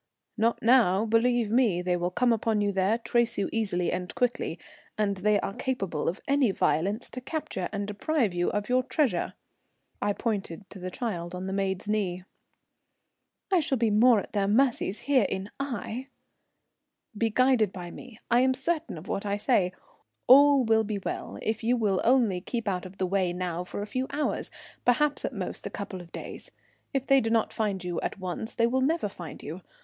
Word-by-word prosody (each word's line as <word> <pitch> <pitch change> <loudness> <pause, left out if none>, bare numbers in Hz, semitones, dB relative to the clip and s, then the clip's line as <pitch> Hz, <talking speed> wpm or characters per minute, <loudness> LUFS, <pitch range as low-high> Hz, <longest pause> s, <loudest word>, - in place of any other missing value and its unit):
"Not 230 +1 +1
now, 225 -4 +5
believe 230 0 +2
me, 220 -8 +3
they 180 0 +1
will 175 0 -1
come 240 +6 +2
upon 220 -1 0
you 205 -1 +1
there; 195 +3 +2
trace 235 0 0
you 200 - 0
easily 185 -6 0
and 180 0 -4
quickly, 245 -1 0 0.4
and 200 -2 0
they 205 +2 +2
are 195 - -3
capable 195 - -2
of 175 - -5
any 275 -4 +3
violence 195 +4 0
to 255 - -6
capture 255 - -4
and 200 -1 -2
deprive 210 - 0
you 175 0 +1
of 210 0 -2
your 255 +1 +3
treasure." 255 - 0 0.7
I 205 - +1
pointed 200 -4 -3
to 195 - -9
the 185 0 -4
child 180 -6 -4
on 180 +1 -5
the 190 - -3
maid's 195 0 -1
knee. 190 -4 -1 1.3
"I 370 - +5
shall 275 -4 0
be 230 -2 +2
more 225 +2 +6
at - - -8
their 200 -2 +1
mercy 240 -1 +2
here 250 +6 +1
in 195 +2 -4
Aix." 255 0 -4 1.1
"Be 225 +2 +1
guided 250 -3 +3
by 175 -2 -7
me. 250 +2 -11
I 240 - +6
am 260 +1 +3
certain 310 - -1
of 160 +5 -10
what 200 - -2
I 200 0 -1
say. 205 -5 +2 0.5
All 280 +1 +7
will 220 0 +4
be 210 -1 -3
well 195 - -5
if 220 0 -2
you 245 +2 +2
will 205 -5 +1
only 230 -8 +3
keep 230 +3 -4
out 185 -2 -1
of 190 +1 -15
the 190 - 0
way 185 -1 0
now 180 -1 -3
for 190 +3 -5
a - - -4
few 255 +4 -2
hours, 300 0 -1 0.3
perhaps 290 +4 +2
at - - -2
most - - -4
a - - -5
couple 195 -2 -6
of 170 -1 -14
days. - - -8 0.4
If 270 -2 -1
they 275 -1 +5
do 225 - -1
not 225 -1 +1
find 200 -4 -1
you 175 -1 -3
at - - -3
once 185 +3 -5
they 230 - +3
will 260 +3 +1
never 310 -2 +1
find 175 -6 -9
you. 165 +6 -6
215 Hz, 195 wpm, -28 LUFS, 190-245 Hz, 1.3 s, All